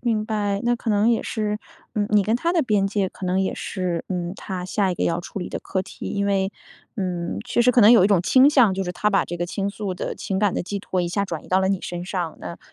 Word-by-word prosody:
明 225 Hz, -3 st, 0 dB
白， 205 Hz, -3 st, -1 dB
那 240 Hz, 0 st, +3 dB
可 230 Hz, -1 st, -3 dB
能 210 Hz, +1 st, +3 dB
也 235 Hz, -1 st, +2 dB
是， 210 Hz, -1 st, -2 dB, 0.4 s
嗯， 205 Hz, -1 st, 0 dB
你 210 Hz, -2 st, +4 dB
跟 220 Hz, -, +1 dB
她 335 Hz, +8 st, 0 dB
的 350 Hz, -, +3 dB
边 210 Hz, -8 st, +2 dB
界 195 Hz, -1 st, 0 dB
可 185 Hz, -, -9 dB
能 185 Hz, +1 st, +1 dB
也 190 Hz, -, -1 dB
是， 180 Hz, -3 st, -3 dB
嗯， 175 Hz, -2 st, -3 dB
她 185 Hz, -2 st, -5 dB
下 195 Hz, +1 st, 0 dB
一 -, -, -1 dB
个 -, -, 0 dB
要 170 Hz, +1 st, 0 dB
处 175 Hz, -, -7 dB
理 180 Hz, -, -4 dB
的 -, -, -5 dB
课 190 Hz, -, -2 dB
题。 185 Hz, -, -8 dB
因 200 Hz, 0 st, -1 dB
为 195 Hz, -1 st, +1 dB, 0.5 s
嗯， 180 Hz, -4 st, -2 dB
确 240 Hz, -, +2 dB
实 250 Hz, -, +5 dB
可 245 Hz, -, +4 dB
能 215 Hz, 0 st, +8 dB
有 230 Hz, -, +7 dB
一 -, -, +4 dB
种 200 Hz, -4 st, +4 dB
倾 260 Hz, +10 st, +5 dB
向， 240 Hz, -10 st, +5 dB
就 195 Hz, -, -1 dB
是 180 Hz, -, -3 dB
她 210 Hz, +4 st, 0 dB
把 200 Hz, -2 st, +2 dB
这 175 Hz, -, -5 dB
个 175 Hz, -, -2 dB
倾 195 Hz, +2 st, -2 dB
诉 200 Hz, -2 st, -4 dB
的 -, -, -4 dB
情 190 Hz, -1 st, -3 dB
感 205 Hz, -3 st, +3 dB
的 -, -, -1 dB
寄 200 Hz, +3 st, -4 dB
托 185 Hz, -1 st, -2 dB
一 175 Hz, -, 0 dB
下 200 Hz, +4 st, -1 dB
转 165 Hz, -5 st, -6 dB
移 -, -, -14 dB
到 185 Hz, +1 st, +3 dB
了 190 Hz, -, +1 dB
你 195 Hz, -2 st, 0 dB
身 175 Hz, 0 st, -5 dB
上， 180 Hz, -4 st, -3 dB
那 170 Hz, -, -7 dB
195 Hz, 305 characters per minute, -23 LUFS, 180-210 Hz, 0.5 s, 能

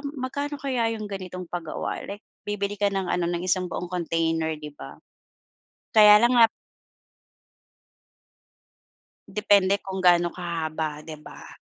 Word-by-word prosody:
magkano 285 Hz, +3 st, -3 dB
kaya 240 Hz, -5 st, 0 dB
yung 215 Hz, -, -6 dB
ganitong 185 Hz, -2 st, -6 dB
pagawa, 170 Hz, -3 st, -4 dB
like, 205 Hz, +1 st, -8 dB, 0.2 s
bibili 205 Hz, 0 st, -2 dB
ka 205 Hz, -, +3 dB
ng 190 Hz, -2 st, -2 dB
ano 175 Hz, -1 st, 0 dB
ng 175 Hz, 0 st, -2 dB
isang 185 Hz, 0 st, +1 dB
buong 180 Hz, -, -5 dB
container, 165 Hz, -2 st, 0 dB
'di 150 Hz, -1 st, -9 dB
ba? -, -, -10 dB, 1.0 s
Kaya 210 Hz, 0 st, +8 dB
lang 245 Hz, +1 st, +4 dB
nga 230 Hz, -1 st, +7 dB, 2.8 s
Depende 200 Hz, -2 st, +3 dB
kung 190 Hz, -1 st, -6 dB
gaano 175 Hz, -1 st, +5 dB
kahaba 160 Hz, -3 st, -3 dB
'di 155 Hz, 0 st, -9 dB
ba? -, -, -12 dB
185 Hz, 130 wpm, -25 LUFS, 170-210 Hz, 2.8 s, Kaya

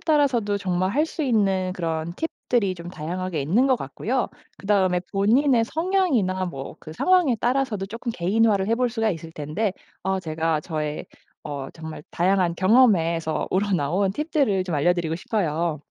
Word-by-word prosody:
따라서도 265 Hz, -10 st, +2 dB
정말 185 Hz, -1 st, 0 dB
할 300 Hz, +3 st, +3 dB
수 320 Hz, 0 st, -5 dB
있는 195 Hz, -8 st, +1 dB
그런 165 Hz, -1 st, -3 dB
팁들이 235 Hz, -, -1 dB
좀 170 Hz, -1 st, -9 dB
다양하게 175 Hz, -1 st, -3 dB
있는 200 Hz, -, +3 dB
것 260 Hz, -2 st, +3 dB
같고요. 235 Hz, -, -2 dB, 0.3 s
그다음에 190 Hz, -3 st, +2 dB
본인의 230 Hz, +5 st, +3 dB
성향이나 300 Hz, -, +1 dB
뭐 135 Hz, -6 st, -6 dB
그 155 Hz, -, -10 dB
상황에 355 Hz, -, +3 dB
따라서도 240 Hz, -4 st, 0 dB
조금 230 Hz, +5 st, -5 dB
개인화를 200 Hz, +1 st, +2 dB
해 225 Hz, -, +2 dB
볼 250 Hz, 0 st, +1 dB
수가 225 Hz, -2 st, 0 dB
있을 165 Hz, -3 st, -6 dB
텐데 165 Hz, +7 st, -2 dB, 0.3 s
어 190 Hz, 0 st, +1 dB
제가 160 Hz, -2 st, -1 dB
저의 150 Hz, -2 st, -3 dB, 0.4 s
어 140 Hz, -2 st, -5 dB
정말 160 Hz, -2 st, -8 dB
다양한 180 Hz, -1 st, +2 dB
경험에서 170 Hz, -7 st, +3 dB
우러나온 190 Hz, -1 st, +1 dB
팁들을 275 Hz, -, 0 dB
좀 180 Hz, -3 st, -3 dB
알려드리고 165 Hz, +2 st, +1 dB
싶어요. 170 Hz, -5 st, -1 dB
190 Hz, 345 characters per minute, -24 LUFS, 165-230 Hz, 0.4 s, 할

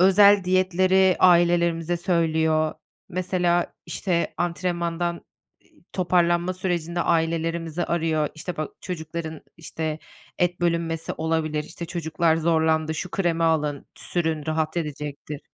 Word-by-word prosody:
özel 200 Hz, +1 st, +6 dB
diyetleri 185 Hz, 0 st, +3 dB
ailelerimize 170 Hz, -1 st, +4 dB
söylüyor. 160 Hz, -3 st, +1 dB, 0.3 s
Mesela, 180 Hz, -1 st, 0 dB
işte, 170 Hz, 0 st, -1 dB
antrenmandan, 170 Hz, -1 st, -2 dB, 0.5 s
iii, -, -, -28 dB
toparlanma 175 Hz, 0 st, +2 dB
sürecinde 175 Hz, -2 st, -2 dB
ailelerimizi 165 Hz, 0 st, 0 dB
arıyor, 160 Hz, -3 st, 0 dB
işte, 175 Hz, +3 st, -6 dB
"Bak, 155 Hz, -1 st, -3 dB
çocukların, 160 Hz, -2 st, -5 dB, 0.2 s
işte, 160 Hz, -1 st, -4 dB, 0.4 s
et 175 Hz, 0 st, +1 dB
bölünmesi 170 Hz, -1 st, -1 dB
olabilir. 160 Hz, -2 st, -1 dB
İşte, 170 Hz, -, -8 dB
çocuklar 160 Hz, -1 st, 0 dB
zorlandı, 160 Hz, -1 st, +1 dB
şu 180 Hz, +3 st, -4 dB
kremi 175 Hz, -5 st, 0 dB
alın, 150 Hz, -3 st, 0 dB
sürün, 160 Hz, -3 st, -2 dB
rahat 155 Hz, +1 st, -1 dB
edecektir." 150 Hz, -2 st, -5 dB
170 Hz, 110 wpm, -24 LUFS, 160-175 Hz, 0.5 s, özel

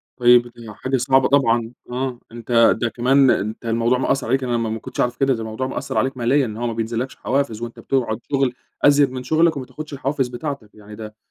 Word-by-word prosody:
طيب، 120 Hz, -1 st, +5 dB
ودي 120 Hz, -2 st, -11 dB
حاجة 130 Hz, +5 st, -2 dB
صعبة 130 Hz, +1 st, +3 dB
طبعًا 120 Hz, -4 st, +2 dB, 0.2 s
آه. 125 Hz, -1 st, -3 dB
أنت 115 Hz, 0 st, +3 dB
ده 120 Hz, -, +1 dB
كمان 130 Hz, +4 st, +3 dB
أنت 110 Hz, +4 st, -2 dB
الموضوع 115 Hz, +2 st, +1 dB
مأثّر 130 Hz, 0 st, 0 dB
عليك 135 Hz, +2 st, +1 dB
أنا 120 Hz, -1 st, 0 dB
ما 115 Hz, -1 st, -1 dB
ما 110 Hz, +1 st, -3 dB
كنتش -, -, -10 dB
أعرف 120 Hz, 0 st, 0 dB
كده. 135 Hz, -1 st, +2 dB
ده 115 Hz, -, -4 dB
الموضوع 110 Hz, +4 st, -4 dB
مأثّر -, -, -4 dB
عليك 130 Hz, 0 st, 0 dB
ماليًا. 130 Hz, +4 st, +2 dB
إن 110 Hz, -2 st, -6 dB
هو 120 Hz, +1 st, -2 dB
ما 115 Hz, -, -2 dB
بينزلّكش 115 Hz, +3 st, -3 dB
حوافز 130 Hz, -4 st, -2 dB
وأنت 120 Hz, 0 st, -7 dB
بتقعد 120 Hz, -5 st, -1 dB
شغل 135 Hz, -3 st, +1 dB, 0.3 s
أزيد 145 Hz, -2 st, +5 dB
من 130 Hz, -1 st, -6 dB
شغلك، 160 Hz, +3 st, +2 dB
وما 130 Hz, -, -5 dB
تاخُدش 155 Hz, +1 st, -9 dB
الحوافز 135 Hz, -1 st, -1 dB
بتاعتك. 125 Hz, -2 st, -6 dB
يعني 105 Hz, 0 st, -12 dB
ده 105 Hz, 0 st, -9 dB
125 Hz, 220 wpm, -21 LUFS, 115-135 Hz, 0.3 s, طيب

